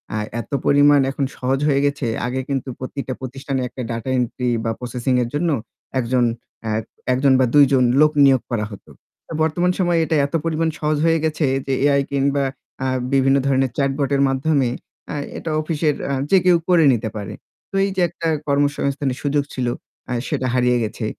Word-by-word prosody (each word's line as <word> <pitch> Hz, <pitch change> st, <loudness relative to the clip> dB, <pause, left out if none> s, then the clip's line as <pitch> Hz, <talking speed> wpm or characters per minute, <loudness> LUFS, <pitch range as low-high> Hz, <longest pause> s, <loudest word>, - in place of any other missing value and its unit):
আ -, -, -1 dB, 0.2 s
এত -, -, -15 dB
পরিমাণ 145 Hz, 0 st, +5 dB
এখন 135 Hz, 0 st, -1 dB
সহজ 130 Hz, +1 st, 0 dB
হয়ে 140 Hz, -2 st, +3 dB
গেছে 140 Hz, -3 st, -1 dB, 0.2 s
আগে 130 Hz, +2 st, -2 dB
কিন্তু 135 Hz, -1 st, -2 dB
প্রতিটা 130 Hz, 0 st, -5 dB
প্রতিষ্ঠানে 135 Hz, +1 st, -4 dB
একটা 125 Hz, -, -8 dB
ডাটা 115 Hz, +2 st, -4 dB
এন্ট্রি 125 Hz, +1 st, -1 dB, 0.2 s
বা 115 Hz, -, +1 dB
প্রসেসিং 125 Hz, +1 st, -2 dB
এর 120 Hz, -, -4 dB
জন্য 165 Hz, +4 st, 0 dB, 0.5 s
একজন 125 Hz, 0 st, +1 dB, 0.4 s
এ্যা 110 Hz, -, -1 dB, 0.4 s
১ -, -, +1 dB
জন 135 Hz, -1 st, +5 dB
বা 130 Hz, -, +4 dB
২ 145 Hz, -1 st, +8 dB
জন 130 Hz, -1 st, +4 dB, 0.2 s
লোক 155 Hz, 0 st, +5 dB
নিয়োগ 135 Hz, -2 st, +4 dB
করা 110 Hz, -3 st, 0 dB
হতো। 100 Hz, -, -12 dB, 0.5 s
বর্তমান 175 Hz, +3 st, +1 dB
সময়ে 175 Hz, -2 st, +2 dB
এটা 160 Hz, -, 0 dB
এত 140 Hz, -, -8 dB
পরিমাণ 165 Hz, 0 st, 0 dB
সহজ 150 Hz, 0 st, 0 dB
হয়ে 165 Hz, 0 st, +3 dB
গেছে 155 Hz, 0 st, 0 dB, 0.2 s
যে 135 Hz, -, -1 dB, 0.2 s
Ai 140 Hz, -, +3 dB
কিংবা 140 Hz, 0 st, +1 dB, 0.4 s
আ -, -, +1 dB, 0.3 s
বিভিন্ন 135 Hz, 0 st, +4 dB
ধরণের 135 Hz, -2 st, +2 dB
চ্যাটবটের 140 Hz, 0 st, +1 dB
মাধ্যমে 135 Hz, -1 st, +1 dB, 0.4 s
এ্যা -, -, -5 dB, 0.2 s
এটা 160 Hz, -, -4 dB
অফিসের 155 Hz, -1 st, 0 dB
এ্যা 140 Hz, -, -1 dB, 0.2 s
যে 195 Hz, -, +7 dB
কেউ 180 Hz, -1 st, +6 dB
করে 175 Hz, -3 st, +5 dB
নিতে 115 Hz, -1 st, -2 dB
পারে। 105 Hz, -2 st, -5 dB, 0.4 s
তো -, -, -6 dB
এই -, -, -1 dB
যে 190 Hz, -, +1 dB
একটা 165 Hz, 0 st, -4 dB, 0.2 s
কর্মসংস্থানের 140 Hz, -2 st, 0 dB
সুযোগ 145 Hz, 0 st, +1 dB
ছিল 125 Hz, -2 st, -2 dB, 0.4 s
আ -, -, 0 dB
সেটা 130 Hz, -, -1 dB
হারিয়ে 125 Hz, -1 st, +3 dB
গেছে। 110 Hz, +1 st, -4 dB
140 Hz, 185 wpm, -21 LUFS, 130-150 Hz, 0.5 s, ২